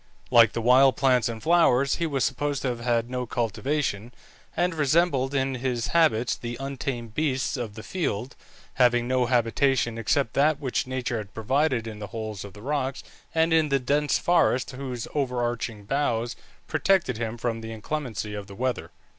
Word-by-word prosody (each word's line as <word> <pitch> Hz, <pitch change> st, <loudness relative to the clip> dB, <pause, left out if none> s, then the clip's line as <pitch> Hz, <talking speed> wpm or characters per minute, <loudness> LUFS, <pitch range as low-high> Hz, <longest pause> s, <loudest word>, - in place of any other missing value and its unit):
Like 115 Hz, -2 st, +6 dB
the 115 Hz, -, -3 dB
wild 130 Hz, +1 st, +5 dB
plants 125 Hz, -3 st, +3 dB
and 110 Hz, -1 st, -6 dB
flowers, 140 Hz, -6 st, +3 dB
he 170 Hz, -, 0 dB
was 140 Hz, -4 st, -1 dB
supposed 140 Hz, +1 st, -1 dB
to 130 Hz, -, +1 dB
have 120 Hz, -1 st, -3 dB
had 120 Hz, -1 st, 0 dB
no 125 Hz, 0 st, -3 dB
cultivation, 120 Hz, -1 st, -2 dB, 0.5 s
and 175 Hz, 0 st, +1 dB
resembled 145 Hz, -3 st, +2 dB
in 135 Hz, 0 st, +1 dB
his 125 Hz, -2 st, -2 dB
habits 125 Hz, -8 st, +3 dB
the 120 Hz, 0 st, -6 dB
untamed 130 Hz, -4 st, -4 dB
beasts 135 Hz, -2 st, 0 dB
of 115 Hz, -5 st, -5 dB
the 110 Hz, -, -8 dB
field, 130 Hz, -, -3 dB, 0.5 s
having 120 Hz, -1 st, +4 dB
no 130 Hz, -1 st, +1 dB
habitation 120 Hz, 0 st, +1 dB
except 115 Hz, +1 st, +1 dB
that 150 Hz, +1 st, +3 dB
which 130 Hz, -3 st, -2 dB
nature 125 Hz, -2 st, -2 dB
had 100 Hz, -2 st, -9 dB
provided 130 Hz, +1 st, +1 dB
in 110 Hz, -2 st, -7 dB
the 105 Hz, -, -6 dB
holes 110 Hz, -2 st, -6 dB
of 100 Hz, -2 st, -10 dB
the 105 Hz, -, -13 dB
rocks, 135 Hz, -1 st, -2 dB, 0.3 s
and 160 Hz, 0 st, +3 dB
in 160 Hz, -2 st, +3 dB
the 140 Hz, -, +3 dB
dense 145 Hz, +3 st, +1 dB
forests 160 Hz, -7 st, +2 dB
whose 130 Hz, -2 st, -5 dB
overarching 120 Hz, -5 st, -2 dB
boughs 120 Hz, -2 st, -1 dB, 0.3 s
protected 185 Hz, -, +1 dB
him 115 Hz, 0 st, -3 dB
from 115 Hz, -1 st, -2 dB
the 115 Hz, 0 st, -7 dB
inclemency 110 Hz, -3 st, -4 dB
of 105 Hz, -1 st, -6 dB
the 100 Hz, -, -11 dB
weather. 125 Hz, +1 st, -2 dB
125 Hz, 175 wpm, -26 LUFS, 115-140 Hz, 0.5 s, Like